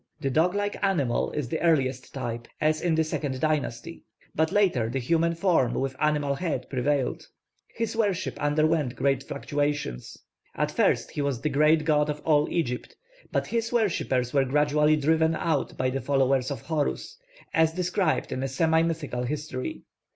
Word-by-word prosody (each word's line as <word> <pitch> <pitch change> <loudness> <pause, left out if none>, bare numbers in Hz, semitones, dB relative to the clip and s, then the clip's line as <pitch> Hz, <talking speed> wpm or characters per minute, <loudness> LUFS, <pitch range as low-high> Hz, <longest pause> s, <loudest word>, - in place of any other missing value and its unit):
The 135 -3 -1
dog 170 +7 +2
like 205 0 -2
animal 150 -12 +1
is 150 -5 -2
the 160 - -2
earliest 135 -6 +1
type, 120 -3 -5
as 155 0 +1
in 170 -2 +1
the 160 - +3
second 145 -4 -3
dynasty; 155 0 -2 0.3
but 160 0 +1
later 175 - +2
the 135 - -2
human 165 +6 +1
form 165 -8 +2
with 135 0 -2
animal 150 -2 +1
head 140 -4 -3
prevailed. 135 0 -1 0.5
His 230 -1 -2
worship 200 -5 0
underwent 150 -2 +1
great 135 -1 +1
fluctuations. 145 - -3 0.4
At - - 0
first - - +1
he 150 - -3
was 140 -4 -1
the 150 - 0
great 150 +2 +3
god 150 -1 +2
of 150 0 -3
all 150 -1 +3
Egypt; 125 -8 -2 0.4
but - - 0
his 230 -1 -2
worshippers 170 - 0
were 140 -2 +4
gradually 150 +2 +3
driven 160 +2 +2
out 155 -2 -1
by 130 0 0
the 135 +1 -2
followers 135 -2 +1
of 140 - -4
Horus, 160 - -2 0.3
as 160 -3 +4
described 180 -1 0
in 130 - -2
a 135 - -1
semi 160 +4 +2
mythical 160 -7 -2
history. 145 -2 -4
150 Hz, 165 wpm, -26 LUFS, 135-165 Hz, 0.5 s, were